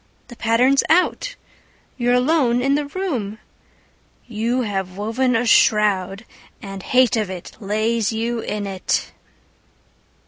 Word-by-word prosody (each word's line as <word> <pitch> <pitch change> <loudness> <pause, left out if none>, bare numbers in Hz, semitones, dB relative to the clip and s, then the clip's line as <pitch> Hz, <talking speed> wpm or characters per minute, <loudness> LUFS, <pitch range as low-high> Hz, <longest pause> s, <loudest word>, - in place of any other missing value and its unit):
The 240 - -10
pattern's 245 +5 +3
out 365 +9 +1 0.6
You're 245 0 +1
alone 250 -2 +2
in 275 +2 +1
the 290 0 0
room! 280 - -3 0.9
You 235 +2 -1
have 190 -3 -4
woven 235 +5 0
a 235 +2 +1
shroud 205 -2 +2 0.3
And 195 -1 -8
hate 255 +2 +3
of 215 -4 -1
it 185 -2 -7
lays 215 +2 0
you 230 +1 -2
in 210 -2 -4
it. 190 -2 -2
230 Hz, 125 wpm, -21 LUFS, 205-255 Hz, 0.9 s, pattern's